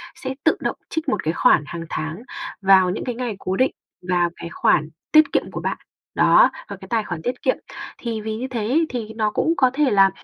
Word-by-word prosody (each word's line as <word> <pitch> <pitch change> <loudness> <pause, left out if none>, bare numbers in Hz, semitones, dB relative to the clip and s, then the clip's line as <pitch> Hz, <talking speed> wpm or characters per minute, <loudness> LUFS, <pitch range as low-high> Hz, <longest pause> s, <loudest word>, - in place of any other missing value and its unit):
sẽ 265 0 -5
tự 320 - +3
động - - -2
trích 320 -2 -2
một 210 -6 -1
cái 160 - 0
khoản 150 - +4
hàng 170 -1 -6
tháng 160 +6 -4 0.4
vào 190 -1 +5
những 185 - -3
cái 245 - -3
ngày 240 -3 -3
cố 185 0 -2
định 260 +6 +2 0.4
vào 175 -1 +2
cái 170 - -8
khoản 155 -2 +2 0.2
tiết 310 -2 +6
kiệm - - 0
của - - -5
bạn. - - -2 0.4
Đó, - - +6 0.2
vào - - -6
cái - - -12
tài 230 -2 0
khoản 175 -5 -5
tiết 245 +7 -3
kiệm, 260 - +1 0.4
thì 230 -2 -4
vì 215 0 -4
như 255 - -4
thế 250 -3 -4
ấy, 315 +7 +2
thì 220 -3 -5
nó 215 -1 0
cũng 325 - +1
có 260 -2 +5
thể 285 -2 +2
là 195 -2 +6
220 Hz, 235 wpm, -22 LUFS, 185-260 Hz, 0.4 s, tiết